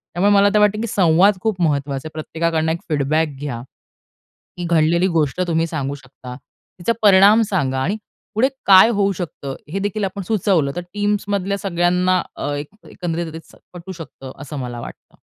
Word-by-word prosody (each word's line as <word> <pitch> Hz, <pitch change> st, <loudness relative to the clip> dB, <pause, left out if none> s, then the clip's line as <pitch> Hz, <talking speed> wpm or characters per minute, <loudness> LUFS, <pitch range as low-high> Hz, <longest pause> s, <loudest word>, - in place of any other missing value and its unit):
त्यामुळे 200 Hz, +4 st, +3 dB
मला 200 Hz, 0 st, +5 dB
आता 210 Hz, +1 st, +3 dB
वाटत, 210 Hz, 0 st, +3 dB
की 230 Hz, -, -2 dB
संवाद 185 Hz, +1 st, +3 dB
खूप 205 Hz, -4 st, -1 dB
महत्वाचा 140 Hz, -2 st, -1 dB
आहे. 155 Hz, -, -10 dB
प्रत्येकाकडनं 160 Hz, 0 st, -1 dB
एक 170 Hz, -, -3 dB
फीडबॅक 155 Hz, +2 st, +1 dB
घ्या. 140 Hz, -5 st, -4 dB, 1.0 s
ही 175 Hz, -, -4 dB
घडलेली 170 Hz, +2 st, +2 dB
गोष्ट 150 Hz, +4 st, 0 dB
तुम्ही 165 Hz, 0 st, +1 dB
सांगू 140 Hz, -4 st, -3 dB
शकता. 130 Hz, -2 st, -11 dB, 0.4 s
तिचा 205 Hz, +7 st, 0 dB
परिणाम 205 Hz, +2 st, +6 dB
सांगा 135 Hz, -9 st, 0 dB
आणि 195 Hz, +10 st, -1 dB, 0.4 s
पुढे 250 Hz, +5 st, +3 dB, 0.2 s
काय 190 Hz, +2 st, +8 dB
होऊ 200 Hz, -2 st, +1 dB
शकतं? 140 Hz, -6 st, -5 dB, 0.2 s
हे 195 Hz, -, -1 dB
देखील 205 Hz, +1 st, -2 dB
आपण 195 Hz, +1 st, -4 dB
सुचवलं 185 Hz, -9 st, +1 dB
तर 175 Hz, -, -1 dB
टीम्स 205 Hz, 0 st, 0 dB
मधल्या 200 Hz, 0 st, -1 dB
सगळ्यांना 180 Hz, -1 st, +1 dB, 0.2 s
अ, 145 Hz, -, -3 dB
एक 145 Hz, +1 st, -5 dB, 0.2 s
एकंदरीत 165 Hz, -2 st, -4 dB, 0.3 s
पटू 180 Hz, +1 st, -9 dB
शकतं, 155 Hz, -6 st, -10 dB
असं 145 Hz, 0 st, -7 dB
मला 120 Hz, -2 st, -5 dB
वाटतं. -, -, -12 dB
175 Hz, 170 wpm, -20 LUFS, 150-200 Hz, 1.0 s, काय